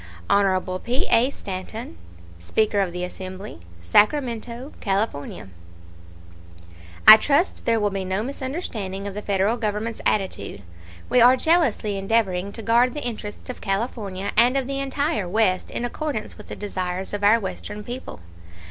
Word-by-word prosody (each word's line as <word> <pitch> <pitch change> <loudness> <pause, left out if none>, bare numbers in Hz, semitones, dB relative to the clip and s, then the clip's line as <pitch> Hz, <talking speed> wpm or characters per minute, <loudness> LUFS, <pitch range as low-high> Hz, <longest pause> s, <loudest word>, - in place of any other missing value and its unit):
HON 185 -2 +2
P. 245 +6 -1
A. 235 +3 +5
STANTON, 190 - -6 0.4
Speaker 210 - +1
of 190 -3 +1
the 180 +1 -4
Assembly, 185 - -7 0.2
Sacramento, 235 - +1
California: 195 - -2 1.6
I 215 - +13
trust 290 - +1
there 230 -1 +3
will 205 -1 +1
be 195 -1 -3
no 190 +3 -1
misunderstanding 250 - -4
of 200 - -4
the 210 - -5
Federal 200 +3 +1
Government's 220 0 -3
attitude. 190 - -1 0.4
We 250 0 +4
are 250 +2 +7
jealously 255 - +2
endeavoring 195 -2 0
to 225 - -7
guard 240 +3 +3
the 295 - -4
interests 215 -3 -6
of - - -12
California 200 -2 -2
and 245 +3 +5
of 270 - 0
the 275 +1 -3
entire 275 - -1
West 185 -2 +1
in 240 - -3
accordance 245 -2 -4
with - - -13
the - - -6
desires 185 -2 -4
of 205 0 -3
our 215 +3 +6
Western 210 +1 -6
people. 245 - -7
210 Hz, 150 wpm, -23 LUFS, 195-245 Hz, 1.6 s, I